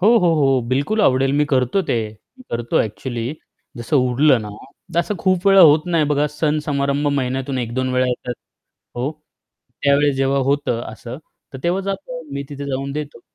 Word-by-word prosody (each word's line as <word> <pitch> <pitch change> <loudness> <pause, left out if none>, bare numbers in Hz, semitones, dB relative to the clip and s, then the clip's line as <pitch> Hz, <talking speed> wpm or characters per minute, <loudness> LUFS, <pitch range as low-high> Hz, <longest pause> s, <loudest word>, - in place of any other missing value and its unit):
हो, 200 - +4
हो, 175 -2 +3
हो. 135 -4 +3
बिलकुल 140 - 0
आवडेल 135 +1 +2
मी - - +4
करतो 130 +9 +2
ते. - - +2 0.4
मी - - -13
करतो 120 0 0
ॲक्चुअली. 115 +2 -5 0.5
जसं 120 +5 -1
उरलं 130 +1 +3
ना, - - -6 0.5
तर - - +2
असं 210 +4 -3
खूप 185 0 +1
वेळा 195 0 +7
होत 150 +1 +4
नाही 165 -2 +3
बघा 150 0 +2
सण 150 0 0
समारंभ 140 0 0
महिन्यातून 130 +1 -2
1-2 125 +2 -2
वेळा 130 0 +2
येतात. 125 0 -3 0.6
हो, 125 +4 -1 0.7
त्यावेळेस 140 0 +3
जेव्हा 135 +1 +1
होतं 140 -5 0
असं, 120 +3 -8 0.3
तर 135 - -7
तेव्हा 175 +3 +1
जातो, 190 -4 -4
मी 140 0 -3
तिथे 140 0 -6
जाऊन 135 0 -3
देतो. 145 -4 -6
140 Hz, 175 wpm, -20 LUFS, 130-150 Hz, 0.7 s, वेळा